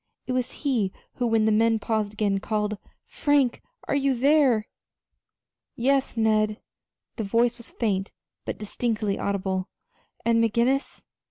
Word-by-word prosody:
It - - -4
was 255 -1 0 0.2
he 230 -9 +1 0.3
who, 245 - +1
when 225 -1 +3
the 220 - +3
men 225 +1 +3
paused 215 -1 -1
again, 205 -2 0
called: 210 0 -2 0.3
"Frank, 285 -4 +1 0.3
are - - 0
you 275 -1 +2
there?" 265 -4 +3 1.1
"Yes, 265 0 +1
Ned." 215 -1 +2 0.6
The 225 - -2
voice 235 +4 +1
was 235 - -10
faint, 195 -4 -1 0.3
but - - -4
distinctly 215 -1 -2
audible. 190 -1 -1 0.6
"And 230 0 +4
McGinnis?" 235 +5 0
225 Hz, 135 wpm, -25 LUFS, 210-245 Hz, 1.1 s, And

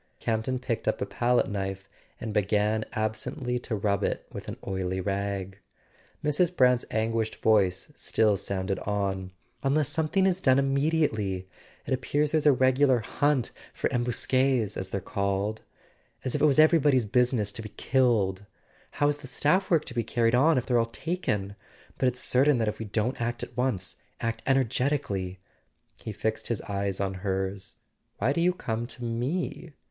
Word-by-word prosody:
" - - -42
Campton 115 +3 -1
picked 125 -2 -3
up - - +1
a - - -1
palette 120 +1 +1
knife 95 -1 -4 0.3
and 110 -2 -4
began 105 +2 +1
ab¬ 110 0 0
sently 125 +1 -4
to 115 - -3
rub 100 -1 0
it - - -1
with - - -8
an - - -5
oily 95 -1 -2
rag. 100 0 -3 0.7
Mrs. 170 +4 +1
Brant's 125 -1 +4
anguished 110 0 -1
voice 100 +2 +2
still 110 -6 +2
sounded 95 0 -2
on. 95 -2 -2 0.3
"Unless 140 +1 +2
something 160 +5 +1
is 190 -1 +1
done 130 -6 +5
im¬ 140 0 +2
mediately... 135 - 0 0.4
It - - -1
appears 145 +3 0
there's 155 -2 +2
a - - +8
regular 130 -1 +3
hunt 145 +3 0 0.2
for - - 0
embusquSs, 125 -1 +1
as 95 0 -3
they're 100 - -2
called. 100 +3 -1 0.6
As 130 - -1
if - - -1
it - - +6
was 140 - +3
everybody's 150 -6 +5
business 120 -1 +2
to 110 - -5
be 110 - -7
killed! 105 -8 +1 0.5
How's 145 0 +2
the 145 -2 -11
staff 185 +9 +1
work 165 -4 +3
to - - -6
be 120 -1 0
carried 115 +1 +1
on 145 +5 +5
if 125 - 0
they're 120 -2 +2
all 115 - +3
taken? 115 - -3 0.4
But 130 - +3
it's 125 0 0
certain 135 +2 +3
that 115 -2 0
if 105 0 -2
we 110 - -4
don't 110 +5 -1
act 120 +1 -2
at 120 - -8
once... 125 -8 -1 0.2
act 115 -1 -2
energetically.. 125 -8 0 0.5
He 110 - -7
fixed 110 +2 -2
his 115 - -1
eyes 100 -1 -2
on 100 -1 -1
hers. 95 0 -2 0.4
"Why 120 +7 +1
do 170 - 0
you 180 +1 +3
come 115 -8 -3
to 125 - -8
me?" 140 +8 -3
115 Hz, 175 wpm, -27 LUFS, 100-135 Hz, 0.7 s, a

